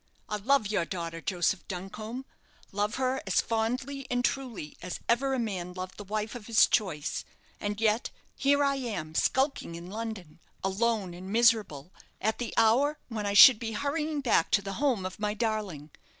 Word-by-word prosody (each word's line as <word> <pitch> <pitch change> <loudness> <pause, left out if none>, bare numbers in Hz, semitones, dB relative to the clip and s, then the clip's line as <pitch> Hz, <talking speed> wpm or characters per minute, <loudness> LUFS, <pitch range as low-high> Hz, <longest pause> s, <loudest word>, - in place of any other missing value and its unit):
I 210 - -1
love 250 +3 +2
your 205 -4 0
daughter, 165 -1 -5
Joseph 180 0 0
Duncombe; 215 +7 -6 0.5
love 205 +2 -1
her 260 0 0
as 195 - +3
fondly 255 +5 -2
and 245 0 +1
truly 240 - -3
as 180 0 -5
ever 265 +3 +2
a - - -1
man 190 -7 -3
loved 185 0 -7
the 205 - -7
wife 215 +2 -3
of 240 -4 -9
his 225 -1 +6
choice. 170 -9 -1 0.4
And 205 0 -3
yet 220 +1 +2 0.3
here 285 +1 +3
am 245 - -1
I - - -15
skulking 265 - 0
in 170 +2 -9
London, 215 -8 -6 0.2
alone 195 -1 0
and 185 +2 -9
miserable, 215 -9 +2 0.3
at 220 +2 -1
the 240 - -3
hour 275 +7 +4
when 215 -3 -3
I 200 - 0
should 225 +2 +10
be 225 -2 -4
hurrying 295 +4 -1
back 230 -10 +2
to 200 - +4
the 195 0 -4
home 250 -10 +1
of 185 +1 -6
my 210 0 -1
darling. 205 -10 -3
215 Hz, 180 wpm, -29 LUFS, 185-245 Hz, 0.5 s, should